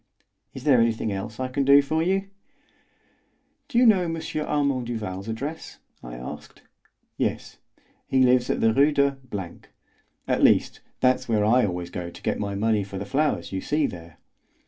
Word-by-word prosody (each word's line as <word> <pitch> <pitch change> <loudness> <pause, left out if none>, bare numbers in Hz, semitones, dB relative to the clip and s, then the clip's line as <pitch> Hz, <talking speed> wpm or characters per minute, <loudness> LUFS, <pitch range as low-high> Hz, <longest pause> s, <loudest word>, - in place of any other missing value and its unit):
Is 130 - -8
there 135 -5 +5
anything 115 -2 0
else 100 +3 -5
I 130 - -1
can 130 +2 -1
do 140 +1 +7
for 160 +3 -1
you?" 195 +3 -1 1.4
"Do 280 -5 -3
you 250 - +6
know 210 -5 +5
M. 165 -2 -3 0.3
Armand 140 -4 0
Duval's 105 -4 -5
address?" 140 +8 -6 0.2
I - - -9
asked. 60 +1 -9 0.5
"Yes; - - -3 0.5
he 130 -1 +3
lives 125 -1 +3
at - - 0
Rue 135 +7 +4
de 140 -1 +1 0.7
——; - - -42
at - - +1
least, - - +3 0.2
that's 130 -1 +2
where 105 -2 +2
I 120 +1 +4
always 90 -1 -5
go 90 -1 -5
to - - -13
get - - -1
my 100 -1 -3
money 105 0 +1
for 95 0 -8
the 100 - -5
flowers 150 +7 -1
you 95 -1 -3
see 150 0 0
there." 85 -5 -8
125 Hz, 170 wpm, -25 LUFS, 100-145 Hz, 1.4 s, do